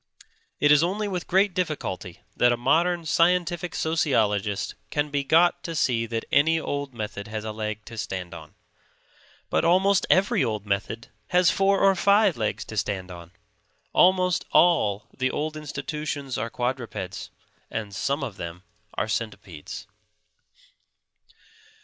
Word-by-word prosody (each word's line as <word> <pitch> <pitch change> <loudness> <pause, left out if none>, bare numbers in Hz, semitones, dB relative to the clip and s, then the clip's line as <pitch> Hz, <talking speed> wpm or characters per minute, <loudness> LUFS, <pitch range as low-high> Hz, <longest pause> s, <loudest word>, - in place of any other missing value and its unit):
It 145 +1 +4
is 150 0 +7
only 200 +5 0
with 180 -3 -4
great 190 +1 +3
difficulty 150 - -4
that 120 - +4
a 120 - +1
modern 170 +7 +2
scientific 175 +1 +1
sociologist 110 -11 0 0.2
can 145 0 -1
be 140 -1 0
got 175 +5 +4
to 165 - -5
see 115 -6 +1
that 115 0 -3
any 160 +3 +4
old 145 -3 -3
method 105 -2 -5
has 110 0 -5
a 110 - -3
leg 105 -1 -5
to 115 -1 -8
stand 90 -4 -5
on. - - -11 1.0
But - - +2
almost 185 +3 +3
every 185 -6 +3
old 110 -4 -2
method 105 +3 -3 0.2
has 180 -1 +4
four 195 0 +2
or 195 0 +6
five 200 0 +4
legs 110 -2 -2
to 110 - -8
stand 95 -2 -2
on. 85 -1 -10 0.6
Almost 185 -1 +4
all 105 - +3
the 130 0 0
old 155 +3 -3
institutions 150 -2 -4
are 115 - -2
quadrupeds; 125 0 -4 0.4
and 105 -2 -5
some 140 +9 -1
of 110 -8 -5
them 85 +1 -7 0.3
are - - -1
centipedes. 105 -6 -5
140 Hz, 145 wpm, -25 LUFS, 110-175 Hz, 1.0 s, is